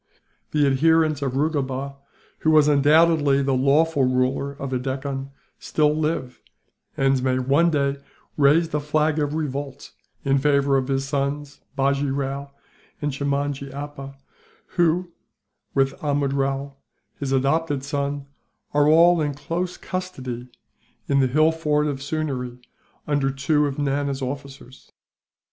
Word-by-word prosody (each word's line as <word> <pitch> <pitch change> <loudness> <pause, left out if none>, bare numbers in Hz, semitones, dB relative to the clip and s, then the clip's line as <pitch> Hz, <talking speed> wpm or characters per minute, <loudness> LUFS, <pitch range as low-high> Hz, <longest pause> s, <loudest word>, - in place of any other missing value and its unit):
The 150 -1 +2
adherents 155 +2 +3
of 135 -2 -2
Rugoba, 140 -2 -1 0.4
who 160 - +1
was 155 -1 +5
undoubtedly 145 -1 +4
the 135 0 +1
lawful 140 +3 +3
ruler 130 +2 +1
of 140 -1 -6
the 130 - 0
Deccan, 135 +1 -4 0.3
still 150 -1 +1
live; 155 -5 -2 0.6
and 135 -1 +2
may 130 0 +1
one 140 +7 +3
day 140 -3 0 0.4
raise 155 +3 +4
the 150 - -1
flag 150 +1 +1
of 145 0 -1
revolt, 140 -2 -4 0.3
in 135 0 +3
favour 140 -1 +2
of 130 -1 +1
his 135 0 -1
sons 140 +1 -3 0.2
Bajee 140 +1 +1
Rao 140 +1 -3 0.5
and 145 0 -1
Chimnajee 140 0 -2
Appa 140 -1 -8 0.5
who, 175 0 +1 0.6
with 135 0 +2
Amrud 145 -2 0
Rao, 135 0 -2 0.4
his 140 -2 -3
adopted 140 +1 +1
son, 140 0 -3 0.5
are 145 0 +4
all 170 +2 +6
in 145 -2 -1
close 170 +5 -3
custody 130 -10 -5 0.6
in 140 -1 +2
the 130 - +3
hill 155 +5 +3
fort 150 -2 0
of 140 -2 -3
Sewneree, 135 -5 -3 0.5
under 145 -2 +1
two 145 +2 +1
of 140 - -5
Nana's 140 -1 -1
officers. 135 -1 -8
140 Hz, 135 wpm, -23 LUFS, 135-150 Hz, 0.6 s, all